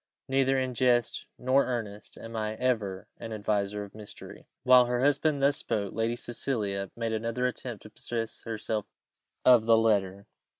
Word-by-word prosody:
Neither 135 0 +2
in 130 -1 -1
jest 120 -1 +1
nor 130 +2 +3
earnest 110 -5 -5
am 115 0 -9
I 110 0 -2
ever 110 -6 -1
an 115 - -7
adviser 105 -1 -1
of 100 - -11
mystery." 105 -1 -11 0.2
While 125 -1 +7
her 120 0 0
husband 145 +1 +2
thus 140 +1 +4
spoke, 100 -9 -2
Lady 115 +2 0
Cecilia 105 -6 -2
made 115 -1 -2
another 115 +3 -1
attempt 125 -3 -4
to 110 - -12
possess 115 0 -4
herself 110 -2 -3 0.6
of 120 -3 +7
the 115 -1 +6
letter. 100 -3 +1
115 Hz, 160 wpm, -29 LUFS, 105-125 Hz, 0.6 s, While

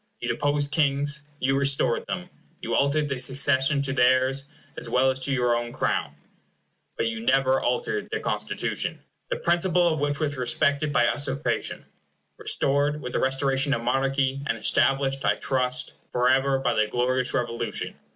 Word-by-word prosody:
You - - -4
deposed 145 -1 0
kings; 145 0 0
you 135 +1 +1
restored 140 -3 +1
them; 180 0 -5 0.3
you 115 - -4
altered 145 +3 +2
the 135 -2 -2
succession 140 +2 +3
to 135 -1 -1
theirs, 130 +1 +2 0.3
as - - -6
well 130 +1 +3
as 130 - -5
to 130 +2 0
your 125 -2 +2
own 120 0 -3
Crown; - - -1 0.8
but - - 0
you 115 0 -2
never 130 +3 +2
altered 425 -3 -1
their - - -2
Constitution, - - -3 0.3
the - - 0
principle 175 0 +2
of 160 -3 0
which 145 0 -1
was 145 -3 -2
respected 140 +4 +1
by 120 -4 +3
usurpation, 140 +2 -2 0.5
restored 145 +2 +1
with 125 -4 -7
the - - +1
restoration 135 +1 +1
of 115 - -5
monarchy, 135 +2 0
and 115 - -1
established, 135 +4 +1
I 105 - +2
trust, 125 -1 -1 0.2
forever, 130 +2 +2
by 135 - 0
the 110 0 +1
glorious 125 +2 0
Revolution. 120 -2 -2
135 Hz, 160 wpm, -25 LUFS, 125-145 Hz, 0.8 s, succession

